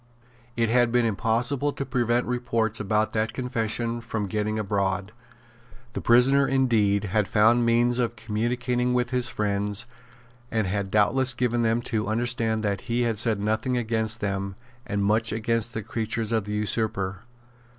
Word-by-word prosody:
It 115 Hz, -1 st, +1 dB
had 120 Hz, 0 st, +3 dB
been 120 Hz, -1 st, +3 dB
impossible 120 Hz, +7 st, 0 dB
to 140 Hz, -, -4 dB
prevent 120 Hz, -2 st, 0 dB
reports 115 Hz, -3 st, -1 dB
about 105 Hz, +1 st, 0 dB
that 110 Hz, 0 st, -1 dB
confession 120 Hz, -2 st, -2 dB
from 110 Hz, -3 st, -3 dB
getting 105 Hz, +2 st, -2 dB
abroad. 100 Hz, -1 st, -1 dB, 0.8 s
The -, -, -4 dB
prisoner, 135 Hz, +4 st, +4 dB
indeed, 110 Hz, -7 st, +2 dB
had 105 Hz, 0 st, 0 dB
found 115 Hz, +3 st, +3 dB
means 120 Hz, +1 st, +2 dB
of 120 Hz, -1 st, 0 dB
communicating 120 Hz, +3 st, -1 dB
with 125 Hz, 0 st, 0 dB
his 125 Hz, 0 st, +2 dB
friends, 105 Hz, 0 st, -1 dB, 0.6 s
and 110 Hz, -2 st, 0 dB
had 100 Hz, +1 st, -2 dB
doubtless 120 Hz, +5 st, +2 dB
given 120 Hz, -1 st, 0 dB
them 115 Hz, +1 st, +1 dB
to 110 Hz, -3 st, -2 dB
understand 115 Hz, -1 st, 0 dB
that 100 Hz, -2 st, -1 dB
he 120 Hz, +1 st, +1 dB
had 115 Hz, -3 st, -1 dB
said 110 Hz, -2 st, +1 dB
nothing 110 Hz, +4 st, 0 dB
against 110 Hz, -1 st, -1 dB
them, 100 Hz, -1 st, -2 dB, 0.3 s
and 100 Hz, 0 st, -1 dB
much 110 Hz, +2 st, +2 dB
against 115 Hz, +1 st, -1 dB
the 110 Hz, -, -3 dB
creatures 115 Hz, +1 st, -2 dB
of 110 Hz, -3 st, 0 dB
the 105 Hz, -, -4 dB
usurper. 105 Hz, -3 st, 0 dB
115 Hz, 155 wpm, -25 LUFS, 105-120 Hz, 0.8 s, prisoner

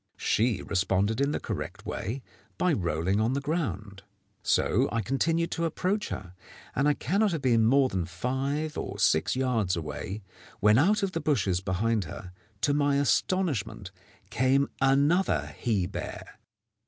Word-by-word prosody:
She 110 Hz, -3 st, +1 dB
responded 100 Hz, +4 st, +1 dB
in 140 Hz, -, +2 dB
the -, -, -1 dB
correct -, -, -5 dB
way, 125 Hz, +6 st, -4 dB, 0.3 s
by 180 Hz, -2 st, +2 dB
rolling 90 Hz, -, 0 dB
on 115 Hz, +4 st, +1 dB
the 140 Hz, -, 0 dB
ground. 110 Hz, -, -3 dB, 0.4 s
So -, -, +2 dB
I 115 Hz, -1 st, -1 dB
continued 165 Hz, -, 0 dB
to 165 Hz, -, -1 dB
approach 190 Hz, +6 st, -1 dB
her, 90 Hz, -1 st, -6 dB, 0.4 s
and 135 Hz, +3 st, +2 dB
I 150 Hz, -, +3 dB
cannot 195 Hz, -, +1 dB
have 155 Hz, -4 st, -3 dB
been 115 Hz, -3 st, +4 dB
more 135 Hz, +2 st, +4 dB
than 95 Hz, -7 st, -2 dB
five 135 Hz, -, -2 dB
or -, -, -5 dB
six 80 Hz, +9 st, +2 dB
yards 120 Hz, -8 st, +1 dB
away, 85 Hz, +6 st, -5 dB, 0.4 s
when 105 Hz, +3 st, +5 dB
out 200 Hz, +7 st, +3 dB
of 195 Hz, -, 0 dB
the 165 Hz, -, -3 dB
bushes 100 Hz, -, +1 dB
behind 100 Hz, +3 st, 0 dB
her, 90 Hz, +4 st, -8 dB, 0.3 s
to 145 Hz, -, +2 dB
my 145 Hz, -1 st, +2 dB
astonishment, 140 Hz, -, 0 dB, 0.4 s
came 135 Hz, +3 st, +2 dB
another 135 Hz, -, +2 dB
he 105 Hz, -6 st, +1 dB
bear. -, -, -7 dB
125 Hz, 155 wpm, -28 LUFS, 95-145 Hz, 0.4 s, when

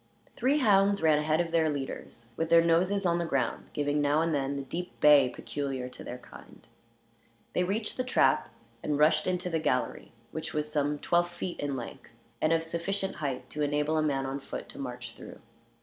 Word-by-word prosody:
Three 265 Hz, +5 st, +2 dB
hounds 200 Hz, -, +4 dB
ran 155 Hz, -2 st, +5 dB
ahead 155 Hz, +1 st, +1 dB
of 170 Hz, -1 st, -3 dB
the 165 Hz, -2 st, +3 dB
leaders, 135 Hz, -4 st, -6 dB
with 160 Hz, +4 st, -2 dB
their 165 Hz, 0 st, +7 dB
noses 180 Hz, +4 st, +2 dB
on 170 Hz, -1 st, +2 dB
the 170 Hz, -, -1 dB
ground, 135 Hz, -5 st, -1 dB
giving 145 Hz, 0 st, 0 dB
now 145 Hz, +2 st, +3 dB
and 165 Hz, -1 st, 0 dB
then 140 Hz, -1 st, -1 dB
the 140 Hz, -, -3 dB
deep 175 Hz, +7 st, -6 dB
bay 145 Hz, -3 st, +7 dB
peculiar 135 Hz, -2 st, -4 dB
to -, -, -10 dB
their 125 Hz, -, -6 dB
kind. -, -, -15 dB, 0.9 s
They 180 Hz, -, +2 dB
reached 210 Hz, +4 st, -2 dB
the 255 Hz, -, 0 dB
trap, 255 Hz, -, +2 dB, 0.3 s
and 150 Hz, -1 st, -1 dB
rushed 155 Hz, +2 st, +4 dB
into 180 Hz, 0 st, -1 dB
the 165 Hz, -, +1 dB
gallery, 125 Hz, -5 st, -1 dB, 0.2 s
which 160 Hz, 0 st, -5 dB
was 150 Hz, 0 st, -1 dB
some 145 Hz, 0 st, 0 dB
twelve 175 Hz, +3 st, +1 dB
feet 175 Hz, +1 st, -5 dB
in 145 Hz, -1 st, -2 dB
length, 120 Hz, -3 st, -8 dB, 0.3 s
and 155 Hz, -, +3 dB
of 165 Hz, 0 st, +2 dB
sufficient 190 Hz, +4 st, -2 dB
height 135 Hz, -5 st, -3 dB
to 150 Hz, -, -4 dB
enable 150 Hz, +1 st, +1 dB
a 155 Hz, -, +2 dB
man 140 Hz, -3 st, 0 dB
on 135 Hz, +1 st, -3 dB
foot -, -, -7 dB
to -, -, -11 dB
march 125 Hz, -3 st, -6 dB
through. 115 Hz, -, -11 dB
155 Hz, 200 wpm, -29 LUFS, 140-170 Hz, 0.9 s, their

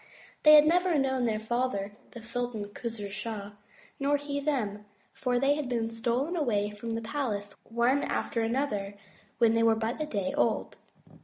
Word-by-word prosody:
They 305 Hz, 0 st, +9 dB
had 300 Hz, 0 st, +8 dB
never 350 Hz, +1 st, +3 dB
known 265 Hz, -2 st, +1 dB
their 220 Hz, -2 st, +1 dB
father, 220 Hz, -2 st, -1 dB, 0.2 s
the 235 Hz, -, -10 dB
Sultan 235 Hz, -3 st, -3 dB
Khos'roo 210 Hz, -2 st, -5 dB
Shah, 205 Hz, 0 st, -5 dB, 0.5 s
nor 285 Hz, +1 st, +2 dB
he 285 Hz, 0 st, -3 dB
them, 220 Hz, -8 st, -2 dB, 0.3 s
for 250 Hz, -2 st, 0 dB
they 275 Hz, +3 st, +3 dB
had 290 Hz, -3 st, -3 dB
been 230 Hz, -2 st, -1 dB
stolen 240 Hz, +8 st, -1 dB
away 210 Hz, -10 st, 0 dB
from 225 Hz, +2 st, -5 dB
the 230 Hz, -, -3 dB
palace 220 Hz, -6 st, -3 dB
one 240 Hz, +4 st, +2 dB
after 225 Hz, -1 st, -1 dB
the 240 Hz, -, 0 dB
other 205 Hz, -8 st, -2 dB, 0.4 s
when 230 Hz, -1 st, +4 dB
they 230 Hz, -, +2 dB
were 225 Hz, -1 st, +5 dB
but 225 Hz, +6 st, -2 dB
a 305 Hz, -, -1 dB
day 200 Hz, -9 st, -2 dB
old. 120 Hz, -, 0 dB
235 Hz, 175 wpm, -29 LUFS, 215-275 Hz, 0.5 s, They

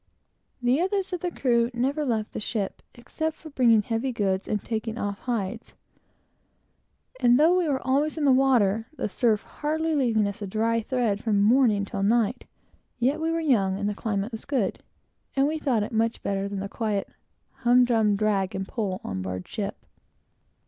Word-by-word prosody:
The 250 Hz, +4 st, +3 dB
rest 395 Hz, -2 st, -1 dB
of 360 Hz, -, -1 dB
the 355 Hz, -, -2 dB
crew 235 Hz, -7 st, +1 dB
never 275 Hz, +5 st, 0 dB
left 225 Hz, -6 st, -1 dB
the -, -, -3 dB
ship, 210 Hz, -2 st, -3 dB
except 315 Hz, +6 st, -4 dB
for 315 Hz, -, -12 dB
bringing 230 Hz, -5 st, +4 dB
heavy 230 Hz, +4 st, -1 dB
goods 195 Hz, -4 st, -1 dB
and 210 Hz, -, 0 dB
taking 225 Hz, 0 st, -3 dB
off 200 Hz, -2 st, -3 dB
hides; 230 Hz, -2 st, -4 dB, 1.4 s
and 245 Hz, +1 st, +5 dB
though 325 Hz, +4 st, +5 dB
we 360 Hz, -2 st, +1 dB
were 270 Hz, -2 st, +1 dB
always 285 Hz, +5 st, +1 dB
in 300 Hz, -, 0 dB
the 275 Hz, -, +6 dB
water, 235 Hz, -5 st, +3 dB
the -, -, -1 dB
surf 215 Hz, +1 st, +1 dB
hardly 315 Hz, +2 st, -2 dB
leaving 235 Hz, -7 st, +2 dB
us 200 Hz, +1 st, -6 dB
a 205 Hz, -, -3 dB
dry 225 Hz, +3 st, 0 dB
thread 225 Hz, -4 st, -1 dB
from 205 Hz, -3 st, +2 dB
morning 220 Hz, -3 st, +4 dB
till 195 Hz, -, -4 dB
night, 230 Hz, +3 st, +1 dB, 0.5 s
yet 270 Hz, +6 st, +1 dB
we 325 Hz, -, 0 dB
were 330 Hz, 0 st, 0 dB
young, 200 Hz, -11 st, +2 dB
and 205 Hz, 0 st, -2 dB
the 210 Hz, -, -1 dB
climate 205 Hz, +1 st, -2 dB
was 225 Hz, -, -6 dB
good, 265 Hz, -8 st, -1 dB, 0.5 s
and 270 Hz, 0 st, +3 dB
we 310 Hz, +1 st, -2 dB
thought 245 Hz, -8 st, +1 dB
it -, -, -5 dB
much 225 Hz, 0 st, 0 dB
better 195 Hz, 0 st, -1 dB
than 200 Hz, -1 st, -4 dB
the 200 Hz, -, -3 dB
quiet, 210 Hz, -2 st, -2 dB, 0.5 s
hum 245 Hz, +1 st, +4 dB
drum 220 Hz, -4 st, +2 dB
drag 200 Hz, -3 st, 0 dB
and 190 Hz, 0 st, -3 dB
pull 195 Hz, -5 st, -3 dB
on 95 Hz, 0 st, -4 dB
board 90 Hz, -1 st, -5 dB
ship. 205 Hz, -2 st, -5 dB
230 Hz, 185 wpm, -26 LUFS, 205-265 Hz, 1.4 s, the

